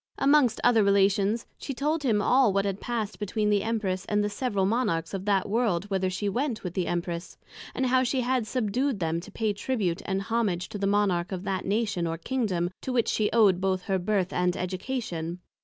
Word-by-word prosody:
Amongst 275 -4 +4
other 230 -3 +5
Relations, 200 +2 +2
she 275 - -5
told 300 +4 0
him 220 -7 +1
all 255 -2 +4
what 195 +1 +1
had 195 0 -2
past 220 -5 -3
between 210 +1 0
the 205 -1 +3
Empress, 195 -5 -1
and 210 0 +1
the 205 - -1
several 205 -3 0
Monarchs 200 -7 0
of 195 0 -4
that 200 -2 +2
World 205 -4 +1
whither 190 -1 +1
she 195 +3 -3
went 240 +3 -1
with 180 -3 -4
the 180 -1 -1
Empress; 175 0 -3 0.4
and 260 - 0
how 255 0 +3
she 260 +1 0
had 250 -2 0
subdued 250 +1 0
them 165 -1 0
to 190 +5 -11
pay 215 0 -1
Tribute 200 -5 -1
and 195 0 -1
Homage 205 -6 -1
to 205 - -6
the 195 - 0
Monarch 195 -3 +1
of 185 -1 -4
that 190 -2 -2
Nation 205 -4 0
or 165 0 -3
Kingdom 185 -4 -1
to 260 - -4
which 240 -3 +1
she 210 -1 +1
owed 205 -5 +4
both 185 -1 0
her 190 -1 0
Birth 190 -1 0
and 180 0 +1
Education. 180 -3 -3
205 Hz, 205 wpm, -27 LUFS, 185-235 Hz, 0.4 s, other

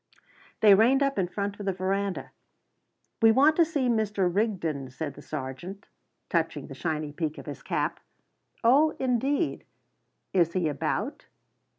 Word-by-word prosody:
They 210 -2 +8
reined 245 +7 +5
up 275 -6 0
in 180 - +1
front 200 +2 -4
of 205 - -6
the 195 - +1
verandah. 195 +1 -2 0.9
"We 225 0 +7
want 285 +7 +5
to 340 - +7
see 290 -5 -1
Mr. 210 -5 +1
Rigden," 170 - -1
said 145 +2 -5
the - - -12
sergeant, 155 +7 -7 0.4
touching - - -1
the - - -9
shiny 155 -3 -3
peak 155 0 -3
of - - -9
his - - -7
cap. - - -2 0.6
"Oh, 285 +7 +5
indeed!" 265 +5 0 0.7
"Is 170 -3 +3
he 180 -3 +1
about?" 145 -3 -3
200 Hz, 150 wpm, -27 LUFS, 165-240 Hz, 0.9 s, They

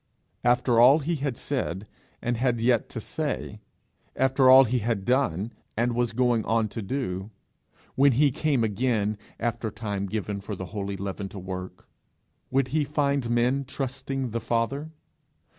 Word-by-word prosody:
After 120 -1 +3
all 130 +5 +8
he 160 +2 -1
had 140 -3 -2
said, 105 -8 -3 0.4
and 120 0 0
had 120 0 +1
yet 120 0 +2
to - - -5
say, - - -4 0.6
after 130 0 +4
all 130 +1 +10
he 125 0 0
had 110 -3 -2
done, 120 -5 +1 0.2
and 120 +1 +1
was 120 -1 0
going 120 -1 +2
on 110 -1 +1
to 115 - -5
do, 100 -4 -3 0.6
when 140 0 +4
he 140 +3 +4
came 145 -3 +1
again, 110 -1 0 0.2
after 115 -1 -2
time 105 -2 -4
given 100 0 -3
for 100 +1 -5
the 95 - -6
holy 100 -1 -3
leaven 95 +1 -4
to 100 - -10
work, 95 0 -7 0.6
would 130 0 +1
he 155 +3 +1
find 140 -3 0
men 120 +3 +2
trusting 135 -1 -4
the 115 +1 -2
Father? 120 +7 -1
120 Hz, 160 wpm, -26 LUFS, 105-135 Hz, 0.6 s, all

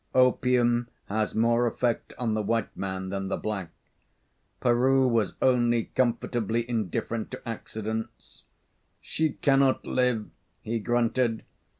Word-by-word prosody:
Opium 125 -2 +3 0.2
has 110 +1 -1
more 115 +2 +3
effect 120 0 -1
on 115 -3 0
the 110 - 0
white 115 +1 -1
man 95 -1 -3
than 95 0 -3
the - - -1
black. 100 -5 -3 0.9
Peroo 130 +2 +3
was 115 -3 +1
only 120 -3 +2
comfortably 120 -2 0
indifferent 110 0 -2
to - - -9
accidents. 110 0 -5 0.6
"She 160 -2 -1
cannot 135 -1 +2
live," 125 -4 +1 0.4
he 115 +1 -2
grunted. 120 +1 +1
115 Hz, 115 wpm, -27 LUFS, 110-125 Hz, 0.9 s, Opium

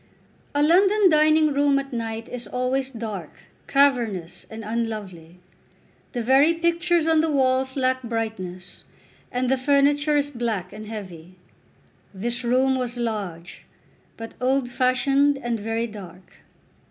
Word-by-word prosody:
A 290 - +3
London 385 +5 +5
dining 310 0 +4
room 285 0 +3
at 275 -1 -4
night 225 -1 -4
is 245 -3 -7
always 255 +3 -1
dark, 215 - -7 0.3
cavernous, 240 -11 +1
and 220 0 -8
unlovely. 210 -7 -5 0.8
The 240 -3 -2
very 275 +7 +4
pictures 340 0 +1
on 320 -1 +4
the 320 - 0
walls 260 -2 +1
lack 260 -1 +1
brightness, 220 -6 -5 0.5
and 250 +1 -1
the 265 +1 +1
furniture 285 +2 +3
is 290 0 0
black 225 -7 -3
and 215 0 -9
heavy. 185 -5 -9 0.8
This 240 +5 -2
room 255 +2 +2
was 245 -1 -3
large, 200 -8 -5 0.5
but 225 0 -8
old 260 0 +1
fashioned 275 +3 +2
and 240 -4 -3
very 225 +2 -2
dark. 190 -5 -12
250 Hz, 130 wpm, -23 LUFS, 220-280 Hz, 0.8 s, London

